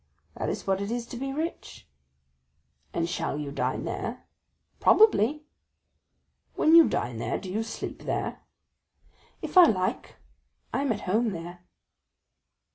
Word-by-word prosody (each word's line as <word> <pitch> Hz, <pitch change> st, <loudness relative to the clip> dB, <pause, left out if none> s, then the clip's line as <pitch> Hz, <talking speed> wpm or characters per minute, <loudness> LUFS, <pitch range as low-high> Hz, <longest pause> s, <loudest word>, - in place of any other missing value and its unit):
"That -, -, -3 dB
is -, -, -4 dB
what 195 Hz, 0 st, 0 dB
it 200 Hz, -, -3 dB
is 235 Hz, 0 st, -2 dB
to 240 Hz, -, -9 dB
be 270 Hz, +3 st, -4 dB
rich." 320 Hz, +5 st, -5 dB, 1.0 s
"And 165 Hz, 0 st, -1 dB
shall 165 Hz, -4 st, -2 dB
you 145 Hz, -2 st, -4 dB
dine -, -, -2 dB
there?" -, -, -5 dB, 0.5 s
"Probably." 300 Hz, -, +4 dB, 1.1 s
"When 315 Hz, -, +3 dB
you 335 Hz, -1 st, +8 dB
dine 120 Hz, -1 st, -2 dB
there, 115 Hz, -, -2 dB
do 185 Hz, -, -7 dB
you 215 Hz, +4 st, -1 dB
sleep 225 Hz, -, -6 dB
there?" -, -, -3 dB, 1.0 s
"If 370 Hz, -, +4 dB
I 355 Hz, -, +11 dB
like; 185 Hz, -, -1 dB, 0.6 s
I -, -, 0 dB
am 280 Hz, -3 st, 0 dB
at 210 Hz, -, -2 dB
home 220 Hz, +5 st, +1 dB
there." 175 Hz, +1 st, -7 dB
220 Hz, 140 wpm, -27 LUFS, 175-275 Hz, 1.1 s, I